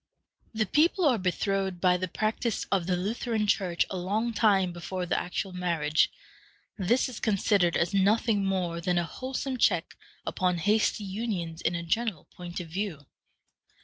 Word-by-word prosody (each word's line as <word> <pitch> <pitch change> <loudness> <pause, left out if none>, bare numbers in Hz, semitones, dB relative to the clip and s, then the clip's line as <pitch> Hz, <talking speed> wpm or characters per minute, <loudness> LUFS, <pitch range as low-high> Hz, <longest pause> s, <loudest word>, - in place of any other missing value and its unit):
The 220 -1 0
people 330 - +3
are 250 -6 +4
betrothed 190 0 -1
by 180 0 +4
the 185 +1 -2
practice 215 +4 -1
of 190 -4 +1
the 180 - +2
Lutheran 220 +3 -1
Church 190 -4 +1
a 190 - -2
long 210 +6 -1
time 195 -5 +3
before 180 +1 -4
the 180 - 0
actual 185 +2 -3
marriage. 165 -4 +1 0.7
This 230 +6 +2
is 250 -4 -7
considered 200 -4 +2
as 170 +4 0
nothing 205 +2 +3
more 180 -3 -1
than 175 +1 +1
a 175 - +2
wholesome 260 +7 -4
check 175 -8 +2 0.3
upon 180 -1 0
hasty 210 +4 +2
unions 190 -5 -3
in 170 - 0
a 170 - -3
general 195 -1 -1
point 175 0 -6
of 175 - -6
view. 170 -4 -4
190 Hz, 160 wpm, -28 LUFS, 175-215 Hz, 0.7 s, are